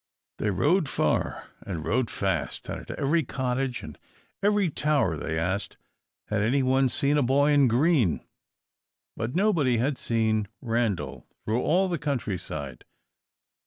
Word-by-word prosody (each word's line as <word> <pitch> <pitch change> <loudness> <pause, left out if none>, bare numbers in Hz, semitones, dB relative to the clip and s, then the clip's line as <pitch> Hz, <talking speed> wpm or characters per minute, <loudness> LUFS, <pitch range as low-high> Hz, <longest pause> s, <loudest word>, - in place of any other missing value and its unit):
They 105 - 0
rode 150 - +2
far - - -1
and 85 -6 -5
rode 125 +1 +1
fast, - - -2
and - - -4
at - - -15
every 155 +4 +2
cottage 130 -2 -2
and - - -10 0.4
every 205 -1 +3
tower 145 - +1
they 80 +1 -3
asked 95 +5 -2 0.5
"had 105 -1 0
anyone 130 +3 +2
seen 145 +2 +2
a - - +3
boy 140 +3 +3
in 145 -2 +5
green?" 125 - +2 0.9
But 115 +5 -4
nobody 170 - +3
had 130 +4 0
seen 110 -2 +1
Randal 100 - -2 0.2
through 115 +3 0
all 185 +7 +2
the 175 -4 -2
country 125 -10 -2
side. 70 -8 -6
125 Hz, 140 wpm, -27 LUFS, 105-145 Hz, 0.9 s, in